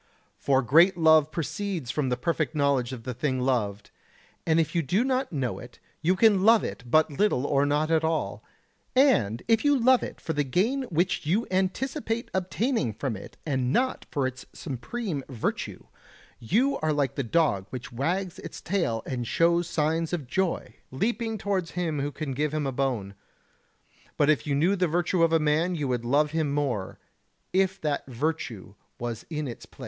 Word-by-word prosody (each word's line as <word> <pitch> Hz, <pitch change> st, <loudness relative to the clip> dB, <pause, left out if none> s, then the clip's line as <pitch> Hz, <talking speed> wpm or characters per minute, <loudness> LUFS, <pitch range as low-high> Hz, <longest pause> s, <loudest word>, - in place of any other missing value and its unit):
For 135 Hz, -1 st, +2 dB
great 170 Hz, +9 st, +5 dB
love 160 Hz, -2 st, +5 dB
proceeds 170 Hz, -, -3 dB
from 145 Hz, -4 st, -1 dB
the 125 Hz, -, 0 dB
perfect 155 Hz, +3 st, -1 dB
knowledge 140 Hz, -4 st, +1 dB
of 125 Hz, -3 st, -7 dB
the 125 Hz, +1 st, -4 dB
thing 130 Hz, +1 st, -1 dB
loved; 110 Hz, -6 st, -1 dB, 0.6 s
and 160 Hz, 0 st, +4 dB
if 165 Hz, 0 st, 0 dB
you 170 Hz, -, +2 dB
do 180 Hz, -, +1 dB
not 265 Hz, 0 st, 0 dB
know 135 Hz, -6 st, -2 dB
it -, -, -12 dB, 0.2 s
you 180 Hz, +4 st, +2 dB
can 205 Hz, -1 st, +4 dB
love 225 Hz, 0 st, +6 dB
it -, -, -5 dB
but 155 Hz, +4 st, +4 dB
little 140 Hz, -4 st, +1 dB
or 140 Hz, 0 st, +2 dB
not 150 Hz, +2 st, +1 dB
at 160 Hz, 0 st, +3 dB
all; 160 Hz, 0 st, -1 dB, 0.5 s
and 195 Hz, -, +3 dB
if 225 Hz, -1 st, +3 dB
you 290 Hz, -1 st, +4 dB
love 255 Hz, +1 st, +4 dB
it -, -, -6 dB
for 160 Hz, -, -3 dB
the 145 Hz, -1 st, +1 dB
gain 225 Hz, -, 0 dB
which 175 Hz, -1 st, 0 dB
you 205 Hz, +9 st, +2 dB
anticipate 230 Hz, +6 st, -1 dB
obtaining 190 Hz, -, 0 dB
from 115 Hz, +2 st, -3 dB
it 100 Hz, -, -11 dB
and 130 Hz, -4 st, 0 dB
not 255 Hz, -, 0 dB
for 140 Hz, -4 st, -1 dB
its 130 Hz, +1 st, -5 dB
supreme 150 Hz, -, -4 dB
virtue, 120 Hz, -5 st, -3 dB, 0.5 s
you 240 Hz, -, +1 dB
are 155 Hz, 0 st, 0 dB
like 140 Hz, -4 st, 0 dB
the 140 Hz, -, -2 dB
dog 120 Hz, -, +1 dB
which 130 Hz, 0 st, -7 dB
wags 175 Hz, +9 st, -2 dB
its -, -, -8 dB
tail 165 Hz, -, -1 dB
and 120 Hz, -3 st, -3 dB
shows 170 Hz, +3 st, +2 dB
signs 160 Hz, +2 st, 0 dB
of 160 Hz, -6 st, -2 dB
joy, 190 Hz, +7 st, -1 dB, 0.2 s
leaping 225 Hz, -, -1 dB
towards 195 Hz, -4 st, -1 dB
him 165 Hz, -4 st, -1 dB
who 145 Hz, +1 st, -2 dB
can 145 Hz, 0 st, -5 dB
give 150 Hz, +3 st, -1 dB
him 150 Hz, -2 st, -1 dB
a 135 Hz, -, -1 dB
bone. 125 Hz, -7 st, -2 dB, 1.0 s
But 150 Hz, +1 st, +4 dB
if 150 Hz, -, -1 dB
you 140 Hz, -, +1 dB
knew 170 Hz, +8 st, +3 dB
the 185 Hz, -2 st, +1 dB
virtue 175 Hz, +2 st, 0 dB
of 165 Hz, -1 st, +4 dB
a 165 Hz, -, +5 dB
man 160 Hz, +4 st, +1 dB
you 150 Hz, -4 st, -2 dB
would 120 Hz, -2 st, -1 dB
love 145 Hz, +4 st, +2 dB
him 160 Hz, -3 st, 0 dB
more 135 Hz, -10 st, -2 dB, 0.6 s
if 190 Hz, 0 st, +2 dB
that 150 Hz, -3 st, -2 dB
virtue 130 Hz, -, -3 dB, 0.2 s
was 120 Hz, -1 st, -5 dB
in 150 Hz, -3 st, -3 dB
its 120 Hz, -, -8 dB
place. -, -, -25 dB
155 Hz, 185 wpm, -27 LUFS, 130-185 Hz, 1.0 s, love